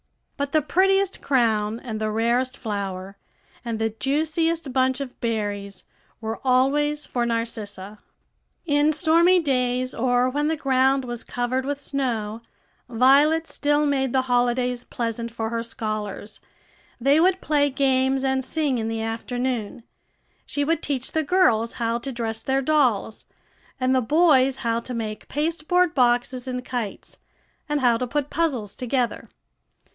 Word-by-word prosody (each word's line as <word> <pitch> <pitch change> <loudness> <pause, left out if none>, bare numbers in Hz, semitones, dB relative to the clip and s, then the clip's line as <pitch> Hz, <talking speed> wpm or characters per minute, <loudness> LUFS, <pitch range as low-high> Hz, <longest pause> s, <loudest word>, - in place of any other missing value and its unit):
But 280 0 -3
the 310 -2 +3
prettiest 390 +3 +2
crown, 225 -4 +1
and 220 -4 -6
the 215 - 0
rarest 240 +4 0
flower, 195 -3 -5 0.5
and 230 -2 -3
the 225 0 0
juiciest 310 +5 -1
bunch 260 0 +2
of 275 -3 -7
berries 205 -4 -3 0.4
were 225 0 -4
always 290 +4 +2
for 245 - -2
Narcissa. 215 -3 -4 0.7
In 290 -1 +3
stormy 340 +3 +4
days, 255 -4 0
or 245 +1 +2
when 290 +3 0
the 320 0 0
ground 265 -1 +2
was 240 -1 -5
covered 245 +2 -2
with 280 +1 -3
snow, 235 -6 -3 0.5
Violet 280 +7 +4
still 295 +1 +1
made 270 -3 +1
the 260 0 +2
holidays 245 0 +1
pleasant 235 -1 -4
for 225 -1 -4
her 230 0 -1
scholars; 215 -2 -5 0.6
they 275 +5 +4
would 370 +2 +3
play 290 -4 +2
games 265 0 +1
and 265 0 +1
sing 280 -2 -1
in 220 - -2
the 225 0 -2
afternoon. 240 0 -3 0.6
She 285 - -1
would 330 +2 0
teach 265 -3 -2
the 315 - +1
girls 260 -9 +2
how 230 0 -1
to 270 +3 -5
dress 225 -2 -3
their 265 +3 0
dolls, 255 -8 +1 0.5
and 255 0 +2
the 260 - +3
boys 270 -1 +4
how 230 0 +1
to 245 +1 -7
make 215 -2 -5
pasteboard 335 +3 +1
boxes 245 0 +1
and 250 -1 -4
kites, 240 -5 -5 0.5
and 295 -1 0
how 240 -2 +4
to 250 +1 -3
put 290 +2 -2
puzzles 265 -12 -1
together. 250 -1 -2
255 Hz, 145 wpm, -24 LUFS, 230-285 Hz, 0.7 s, stormy